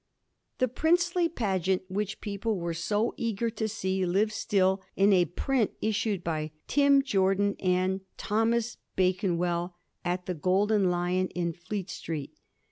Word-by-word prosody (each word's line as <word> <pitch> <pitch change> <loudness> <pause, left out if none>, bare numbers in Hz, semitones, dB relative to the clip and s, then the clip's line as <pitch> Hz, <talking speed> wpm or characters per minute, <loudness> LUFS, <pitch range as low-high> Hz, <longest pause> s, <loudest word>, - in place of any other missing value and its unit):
The 255 - +2
princely 345 +6 +2
pageant 190 - 0
which 200 +2 -3
people 210 +1 -2
were 170 -1 -2
so 205 +7 0
eager 230 0 -1
to 220 0 -2
see 190 -3 -1
lives 200 +4 +1
still 190 -3 +1
in 200 +1 +5
a 180 -2 +5
print 225 - 0
issued 210 -3 -1
by 155 -2 -1
^ - - -17
Tim. 280 -1 +4
Jordan 200 -3 +2
and 185 +1 +1 0.2
Tho. 225 +3 +2 0.4
Bakenwell 180 -2 0 0.3
at 180 +1 -2
Ye 180 - -1
Golden 190 +4 +2
Lion 180 +1 +1
in 170 -2 -2
Fleet 185 +3 -5
Street.' 155 -4 -5
195 Hz, 140 wpm, -28 LUFS, 180-220 Hz, 0.4 s, in